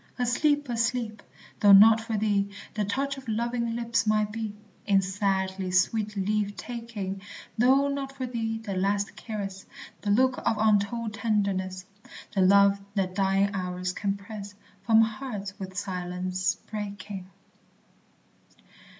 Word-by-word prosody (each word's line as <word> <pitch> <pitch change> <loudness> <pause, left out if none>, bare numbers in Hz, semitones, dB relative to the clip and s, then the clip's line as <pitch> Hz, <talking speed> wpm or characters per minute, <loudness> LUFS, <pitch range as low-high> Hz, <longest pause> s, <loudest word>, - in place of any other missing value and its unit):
Asleep! 290 +4 +2
asleep! 235 -2 -1 0.4
though 205 -1 +7
not 220 +3 +8
for 225 -1 -2
thee 200 -1 +1 0.2
The 210 -1 -1
touch 275 +7 -1
of 265 - -15
loving 235 +1 -1
lips 230 -1 0
might 215 -1 +2
be, 220 -1 -3 0.4
In 200 -2 +5
sadly 190 -1 -1
sweet 210 +4 +1
leave 205 +1 0
taking: 215 -3 -5 0.3
Though 265 +4 +4
not 280 -1 -3
for 270 -1 -5
thee 225 -2 -2
the 220 -3 -5
last 200 +2 0
caress, 195 -4 -5 0.4
The 205 - -3
look 255 +5 +3
of 220 - 0
untold 215 +1 +1
tenderness, 195 -4 -1 0.5
The 195 - +2
love 200 +1 +5 0.2
that 190 -2 0
dying 195 +1 +2
hours 180 -1 -3
can 200 0 -1
press 205 0 -9 0.3
From 225 -1 +7
hearts 215 -3 -3
with 190 -1 -7
silence 185 -1 -2
breaking. 200 -2 -7
205 Hz, 135 wpm, -27 LUFS, 195-230 Hz, 0.5 s, not